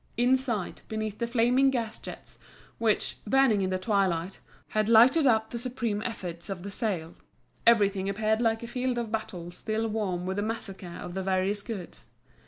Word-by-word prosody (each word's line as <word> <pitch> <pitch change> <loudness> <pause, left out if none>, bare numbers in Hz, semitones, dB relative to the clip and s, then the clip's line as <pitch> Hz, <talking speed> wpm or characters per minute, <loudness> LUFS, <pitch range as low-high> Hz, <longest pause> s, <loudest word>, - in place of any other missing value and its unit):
Inside, 245 -4 +1
beneath 215 -1 -4
the 235 - 0
flaming 250 +3 +4
gas 230 -4 -2
jets, - - -10 0.4
which, 225 -2 +1
burning 255 -3 +4
in 190 - 0
the 185 - 0
twilight, 185 -3 0 0.3
had 215 0 +1
lighted 260 +7 +7
up 220 -2 +3
the 235 - -3
supreme 235 -4 -2
efforts 180 -6 -5
of 185 -3 -5
the 200 - -6
sale, 185 -7 -2 0.5
everything 200 -4 +4
appeared 215 +2 +1
like 225 -1 +1
a - - -5
field 250 +1 -1
of 235 -2 -3
battle 180 -6 -4
still 220 +5 -2
warm 200 -5 -2
with 190 +1 -2
the - - +1
massacre 195 -5 -5
of 175 - -7
the 190 - -2
various 190 +2 0
goods. 200 -6 -8
215 Hz, 175 wpm, -28 LUFS, 190-235 Hz, 0.5 s, lighted